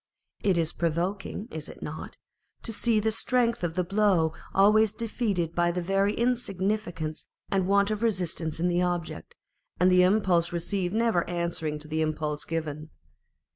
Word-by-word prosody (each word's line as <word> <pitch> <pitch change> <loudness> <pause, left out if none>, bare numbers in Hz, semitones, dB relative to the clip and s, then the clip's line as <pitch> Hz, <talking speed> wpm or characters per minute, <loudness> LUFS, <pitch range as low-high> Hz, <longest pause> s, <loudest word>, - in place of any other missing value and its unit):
It 195 -3 +2
is 165 -1 0
provoking 180 +6 -2
(is 155 -1 -6
it - - -10
not 155 +1 -7 0.2
?) - - -43
to 225 - -3
see 225 0 +2
the 220 +1 +1
strength 235 0 0
of 170 -1 -1
the 180 - +1
blow 190 -4 +2 0.2
always 210 +2 +4
defeated 210 -7 -1
by 175 0 +2
the 180 - -2
very 195 +3 +1
insignificance 195 -9 -1 0.2
and 190 -2 +1
want 200 +1 +3
of 215 0 -2
resistance 175 -8 -1
in 175 - +1
the 175 0 +2
object, 175 - -3 0.4
and 180 +1 +5
the 180 0 +6
impulse 180 -3 +3
received 175 +2 -2
never 225 -6 +2
answering 170 -3 -2
to 150 +1 -9
the 155 +1 -1
impulse 155 -1 -2
given. 155 -2 -4
180 Hz, 165 wpm, -27 LUFS, 165-210 Hz, 0.4 s, the